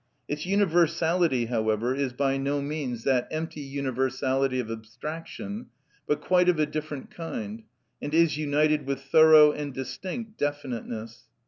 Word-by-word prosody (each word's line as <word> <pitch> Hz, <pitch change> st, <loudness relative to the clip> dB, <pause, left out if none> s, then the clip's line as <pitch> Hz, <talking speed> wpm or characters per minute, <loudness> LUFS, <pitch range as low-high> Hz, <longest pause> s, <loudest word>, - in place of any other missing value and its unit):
Its 150 Hz, +3 st, -4 dB
universality, 170 Hz, -, +2 dB
however, 110 Hz, +1 st, 0 dB
is 135 Hz, -1 st, -1 dB
by 135 Hz, +2 st, 0 dB
no 140 Hz, +1 st, 0 dB
means 140 Hz, -5 st, -3 dB
that 130 Hz, -3 st, +2 dB
empty 155 Hz, -1 st, -4 dB
universality 135 Hz, -1 st, -1 dB
of 115 Hz, -2 st, -3 dB
abstraction, 160 Hz, -, -7 dB, 0.4 s
but 150 Hz, -, 0 dB
quite 180 Hz, -1 st, +3 dB
of 175 Hz, -, +3 dB
a 155 Hz, -, +3 dB
different 150 Hz, -2 st, -5 dB
kind, 210 Hz, +6 st, -6 dB, 0.4 s
and 145 Hz, -, -4 dB
is 165 Hz, -1 st, +4 dB
united 150 Hz, -1 st, +1 dB
with 140 Hz, -1 st, -1 dB
thorough 155 Hz, +1 st, +7 dB
and 145 Hz, -3 st, -5 dB
distinct 215 Hz, -, -6 dB
definiteness. 120 Hz, -6 st, -4 dB
145 Hz, 135 wpm, -27 LUFS, 130-160 Hz, 0.4 s, thorough